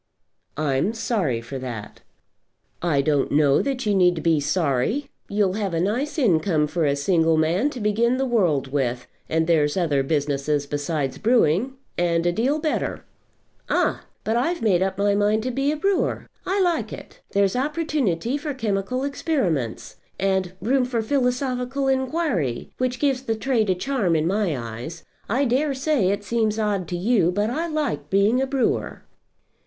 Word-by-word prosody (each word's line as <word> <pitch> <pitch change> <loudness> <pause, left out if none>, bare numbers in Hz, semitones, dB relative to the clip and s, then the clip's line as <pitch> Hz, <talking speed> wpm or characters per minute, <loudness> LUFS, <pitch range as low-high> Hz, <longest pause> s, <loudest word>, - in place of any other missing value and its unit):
"I'm 150 +6 0
sorry 180 - -1
for 130 +3 -6
that." 120 -5 -7 0.8
"I 150 -5 +2
don't 145 -2 +1
know 145 -1 +4
that 265 -3 -2
you 210 - +2
need 180 -4 +3
be 165 -2 +3
sorry. 160 - 0 0.2
You'll 200 -2 +1
have 200 -4 -2
a - - +1
nice 240 - -1
income 175 - +2
for 165 +1 -1
a 140 -1 +2
single 165 +1 +2
man 170 - +2
to 260 - -7
begin 230 +4 +1
the 270 - 0
world 170 - +1
with, 125 -3 -1 0.2
and 160 0 +1
there's 155 -1 +2
other 155 -6 +2
businesses 145 0 0
besides 145 -1 -2
brewing, 230 - +2 0.3
and 170 -1 +1
a 175 - +3
deal 250 - +1
better." 310 0 -2 0.6
"Ah! - - +1 0.2
But 225 +2 0
I've 335 +6 0
made 190 -5 +3
up 190 0 0
my 200 0 +2
mind 210 +2 +2
to 255 - -1
be 275 +3 0
a 305 - -2
brewer. 390 +3 0 0.2
I 385 +2 +1
like 350 -3 +1
it. - - -10
There's 200 0 +2
opportunity 275 - 0
for 295 -2 -4
chemical 220 +2 -1
experiments, 205 - -2 0.2
and 190 -2 0
room 255 +6 +2
for 245 -2 -1
philosophical 255 +1 0
inquiry, 265 - -1
which 255 0 0
gives 275 -3 +1
the 225 -4 -2
trade 220 -2 0
a 185 - +3
charm 200 -4 0
in 155 0 +1
my 190 -4 0
eyes. 120 +8 -7 0.2
I 260 +7 +2
dare 270 +3 +1
say 265 -8 +1
it 200 +1 -1
seems 220 0 0
odd 205 -5 -1
to 175 - -3
you, 190 -2 +2
but 205 +4 0
I 325 +7 -1
like 305 -5 -2
being 205 +6 +3
a 270 - 0
brewer." 265 -2 -1
205 Hz, 170 wpm, -23 LUFS, 160-255 Hz, 0.8 s, know